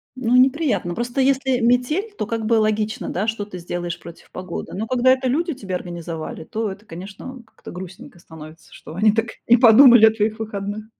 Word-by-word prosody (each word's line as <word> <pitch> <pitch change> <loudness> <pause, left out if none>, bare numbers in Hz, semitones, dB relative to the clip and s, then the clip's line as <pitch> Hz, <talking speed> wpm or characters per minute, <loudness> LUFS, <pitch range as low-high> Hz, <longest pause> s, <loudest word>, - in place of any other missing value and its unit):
Ну, 250 -1 0
неприятно. 255 - +2
Просто 240 +4 -2
если 265 -1 +1
метель, 250 - +1
то 210 - -4
как 225 -1 -3
бы 230 - +1
логично, 215 +2 -1
да, 200 +5 -2
что 220 -2 -2
ты 185 -3 -9
сделаешь 175 0 -5
против 170 0 -14
погоды. 185 -2 -7
Но 215 +4 -3
когда 255 +1 +2
это 260 0 +1
люди 325 +5 -1
тебе 195 -7 -7
организовали, 170 -3 -6
то 215 +3 -4
это, 205 +3 -12
конечно, 195 +8 -9
а, - - -15
как-то - - -13
грустненько 180 -1 -11
становится, 160 -1 -14
что 155 - -12
они 210 +4 +3
так 225 +1 0 0.2
не 240 +1 +6
подумали 240 -1 +8
о 220 - +6
твоих 215 0 -1
выходных. 210 0 -5
220 Hz, 195 wpm, -21 LUFS, 185-250 Hz, 0.2 s, подумали